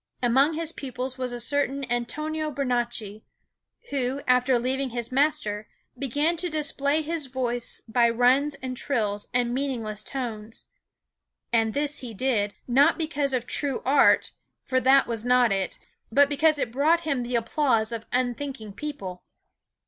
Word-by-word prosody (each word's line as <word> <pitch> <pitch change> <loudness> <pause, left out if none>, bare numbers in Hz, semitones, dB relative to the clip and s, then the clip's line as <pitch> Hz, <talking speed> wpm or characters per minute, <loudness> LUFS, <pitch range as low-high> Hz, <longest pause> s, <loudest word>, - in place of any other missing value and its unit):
Among 270 +6 +4
his 325 0 -1
pupils 260 -2 -5
was 255 -1 -2
a 245 - -5
certain 275 +2 0
Antonio 305 +6 -2
Bernacchi, 240 -6 -2 0.7
who, 270 0 -1
after 250 0 +3
leaving 260 +2 -1
his 235 0 -4
master, 265 -7 0 0.3
began 290 +6 0
to 355 +2 0
display 300 -1 0
his 315 -2 -2
voice 245 -2 -2
by 235 +1 +3
runs 255 +5 +3
and 255 -1 -3
trills 215 -7 -1
and 245 -1 +1
meaningless 235 -6 -2
tones. 225 -5 -5 0.9
And 225 -1 +2
this 290 0 0
he 235 -4 -7
did, 210 -4 0
not 280 +6 +4
because 295 -4 -1
of 250 -2 -1
true 275 0 -1
art, 275 +2 +4 0.3
for 260 - +1
that 270 +1 +5
was 230 -2 -3
not 250 -2 +4
it, 195 -1 -1 0.3
but 280 +4 +5
because 300 +1 +3
it 245 -5 -2
brought 305 +7 +3
him 295 -6 -1
the 245 0 -3
applause 235 -2 +1
of 230 -1 -5
unthinking 250 -3 -2
people. 195 -10 -6
255 Hz, 150 wpm, -26 LUFS, 235-285 Hz, 0.9 s, that